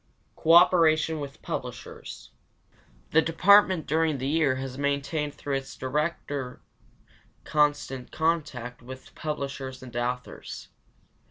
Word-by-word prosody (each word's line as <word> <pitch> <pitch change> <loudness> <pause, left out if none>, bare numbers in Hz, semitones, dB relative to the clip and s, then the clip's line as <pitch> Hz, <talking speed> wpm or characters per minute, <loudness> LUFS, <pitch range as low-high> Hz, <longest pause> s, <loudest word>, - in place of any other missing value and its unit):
Cooperation 160 -2 +5
with 140 -1 -8
publishers. - - -7 0.8
The 160 - +5
department 185 +1 +5
during 160 -1 +1
the 130 - -4
year 150 -3 +2
has 130 0 -5
maintained 140 +1 -1
through 140 -1 -2
its 135 0 -8
director 145 -1 -3 0.8
constant 145 -4 0
contact 145 -7 -2
with 130 +1 -11
publishers 135 -3 -5
and 125 -2 -11
authors. 125 +1 -4
145 Hz, 100 wpm, -27 LUFS, 130-160 Hz, 0.8 s, Cooperation